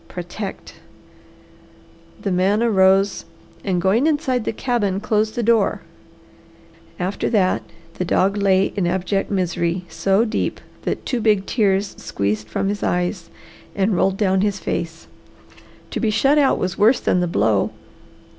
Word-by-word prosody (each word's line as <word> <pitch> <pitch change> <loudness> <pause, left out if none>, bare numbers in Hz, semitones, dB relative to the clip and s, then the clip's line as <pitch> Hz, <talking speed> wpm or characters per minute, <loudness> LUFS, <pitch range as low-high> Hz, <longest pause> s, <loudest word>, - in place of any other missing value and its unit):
Protect!" 185 +3 -7 1.4
The 200 - -3
man 195 +5 +2
arose 195 -2 +3 0.4
and 185 -3 0
going 200 - +2
inside 270 -6 0
the - - 0
cabin 215 -5 -1
closed 215 +1 0
the 240 - -1
door. 225 -2 +2 1.2
After 185 +2 -2
that 195 -5 +2 0.4
the - - +1
dog 190 +2 +1
lay 195 -1 +2
in 190 -4 0
abject 190 +2 -1
misery 175 -2 -1
so 195 +7 +1
deep 220 - -2 0.3
that - - -3
two 245 -3 -1
big 210 -3 +2
tears 200 -3 +1
squeezed 105 +2 -2
from 195 - -1
his 205 0 -3
eyes 180 -1 -1 0.5
and 200 0 +1
rolled 190 +2 +1
down 190 -2 +2
his 205 -1 0
face. 165 -3 -4 0.9
To - - -3
be 225 - +1
shut 275 +7 +3
out 275 -2 +3
was 185 0 -3
worse 225 +5 +5
than 180 - +1
the 180 - 0
blow. 105 - +1
195 Hz, 145 wpm, -21 LUFS, 180-215 Hz, 1.4 s, worse